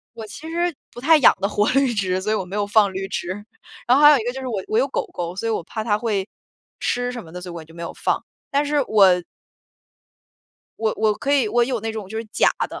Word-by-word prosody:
我 225 -1 -7
其 290 +9 -9
实 345 0 0 0.2
不 240 - -9
太 320 +5 +6
养 - - +6
得 200 - +1
活 210 0 +1
绿 270 -1 +3
植， 185 -3 0
所 215 +3 -1
以 - - +2
我 205 - -1
没 185 +3 -7
有 205 - 0
放 205 -1 +3
绿 195 +1 -4
植。 185 - -4 0.6
然 250 +1 +5
后 285 - +3
还 295 - +11
有 290 - +6
一 - - -3
个 245 - -1
就 265 - -6
是 260 - -6
我 210 -6 -3
我 215 - +1
有 265 - +3
狗 - - -2
狗， 175 0 -4
所 230 - -3
以 - - +1
我 210 - -1
怕 215 +4 -5
它 210 -3 +2
会 210 -4 -1 0.5
吃 245 0 -1
什 240 -3 -6
么 160 - -14
的， 180 - -7
所 180 0 -8
以 - - -8
我 165 -2 -7
就 160 +1 -17
没 170 - -8
有 170 - -5
放， - - -1 0.3
但 285 +1 +2
是 290 0 +1
我 205 -3 +6 1.7
我 220 -1 0
我 215 -1 +2
可 275 +6 -2
以， 265 -7 +3
我 240 +2 +3
有 245 -2 -2
那 225 +1 -3
种 215 -3 -6
就 220 - -6
是 225 - -3
假 215 - +3 0.2
的。 - - -8
220 Hz, 295 characters per minute, -22 LUFS, 195-255 Hz, 1.7 s, 还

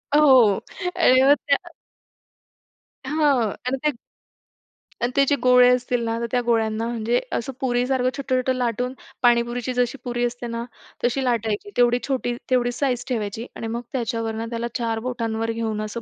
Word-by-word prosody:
हो 300 0 +6 0.7
आणि 260 -7 +5
मग 280 +1 +7
त्या 280 - 0 1.3
हां 300 +3 0 0.4
आणि 265 +1 0
ते - - +5 1.1
आणि 245 - +1
त्याचे 280 0 +4
गोळे 250 0 +7
असतील 245 -1 -2
ना, 225 0 -1
तर 235 - -2
त्या 250 - +2
गोळ्यांना 225 -1 +1
म्हणजे 235 +1 0 0.2
असं 265 +3 -4
पुरीसारखं 250 0 +1
छोटं-छोटं 260 -2 0
लाटून 250 +1 -1 0.3
पाणीपुरीची 240 +1 +2
जशी 245 +2 0
पुरी 240 0 -1
असते 240 0 -4
ना 230 0 -4 0.4
तशी 245 +3 +1
लाटायची. 225 - -1
तेवढी 245 0 +4
छोटी, 245 -3 -1
तेवढी 245 -1 +2
साइज 250 -3 0
ठेवायची 220 -1 -3
आणि 225 - -5
मग 235 - -3
त्याच्यावरनं 230 -2 -2
त्याला 235 0 -3
चार 230 -2 -1
बोटांवर 225 -2 -2
घेऊन 225 -2 -2
असं 215 +2 -5
245 Hz, 150 wpm, -23 LUFS, 230-255 Hz, 1.3 s, मग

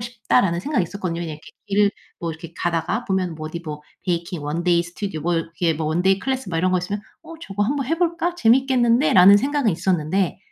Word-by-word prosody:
싶다.'라는 230 -6 +1
생각이 255 -3 0
있었거든요. 175 -1 -4
그냥 155 -3 -6
이렇게 - - -14 0.4
일 - - +1 0.3
뭐 170 - -2
이렇게 160 +1 -9
가다가 175 +8 -1
보면 185 -3 -1
뭐 155 0 -6
어디 170 +1 -6
뭐 150 -3 -7 0.2
베이킹, 170 -2 -2
원데이 170 +3 +1
스튜디오, 175 -1 -6
뭐 175 - 0
이렇게 165 0 -1
뭐 155 0 -3
원데이 180 +5 +2
클래스 265 -3 -3
막 165 - -1
이런 185 +2 +2
거 - - +3
있으면 200 +4 -4 0.2
'어 330 0 -10
저거 205 -8 -3
한 265 +8 0
번 275 -3 -2
해 325 +3 0
볼까? 340 0 0
재밌겠는데?'라는 240 - +5
생각은 275 -1 +1
있었는데 180 +1 0
185 Hz, 460 characters per minute, -22 LUFS, 170-240 Hz, 0.4 s, 재밌겠는데?'라는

